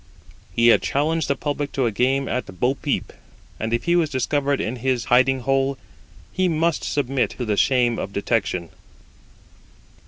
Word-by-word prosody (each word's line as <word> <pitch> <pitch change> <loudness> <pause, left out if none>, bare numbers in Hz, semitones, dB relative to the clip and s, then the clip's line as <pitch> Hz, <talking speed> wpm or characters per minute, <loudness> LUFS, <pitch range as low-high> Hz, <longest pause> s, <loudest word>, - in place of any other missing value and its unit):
He 115 0 +4
had - - +5
challenged 155 +3 0
the 140 - +1
public 145 0 -3
to 135 - 0
a 115 - +1
game 135 +5 +1
at 115 -8 -4
bo 125 +2 +2
peep, 135 - -3 0.5
and 110 +1 -3
if 115 - 0
he 170 - +2
was 165 -3 +2
discovered 140 +1 0
in 120 +4 -3
his 125 -1 -1
'hiding 130 +1 +3
hole,' 135 +1 +1 0.6
he 185 0 +1
must 165 0 0
submit 135 -2 0
to 125 - -3
the 105 -2 0
shame 120 0 +2
of 100 - -4
detection. 100 -5 -1
130 Hz, 165 wpm, -22 LUFS, 120-140 Hz, 0.6 s, had